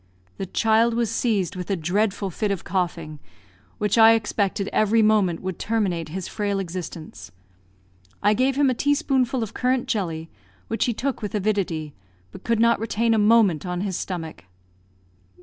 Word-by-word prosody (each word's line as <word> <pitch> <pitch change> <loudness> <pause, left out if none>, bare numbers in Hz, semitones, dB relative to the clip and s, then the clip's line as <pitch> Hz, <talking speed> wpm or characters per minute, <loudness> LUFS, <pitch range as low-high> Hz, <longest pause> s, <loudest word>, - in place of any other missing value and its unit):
The 190 - -4
child 225 +3 +2
was 235 -2 0
seized 200 -6 0
with 180 +1 -6
a 195 - +1
dreadful 195 +3 -1
fit 210 +5 -2
of 195 -3 -2
coughing, 170 -4 -3 0.6
which 210 +2 +1
I 225 0 +8
expected 205 -3 -1
every 215 +1 +3
moment 205 -6 +2
would 185 -2 -4
terminate 195 -8 -1
his 185 +3 -5
frail 205 -2 -2
existence. 170 - -7 0.9
I 205 +1 +4
gave 260 +4 +1
him 280 -2 +3
a - - +1
teaspoonful 265 -3 +1
of 220 - -7
currant 255 0 0
jelly, 165 -7 -3 0.4
which 225 - 0
he 240 - 0
took 270 +2 -2
with 210 -1 -4
avidity, 185 -7 -1 0.4
but - - -12
could 230 -1 0
not 235 -1 +4
retain 225 +1 0
a 220 - +2
moment 210 -7 +4
on 180 -1 -3
his 195 -2 -2
stomach. 165 - -5
205 Hz, 165 wpm, -23 LUFS, 180-225 Hz, 0.9 s, I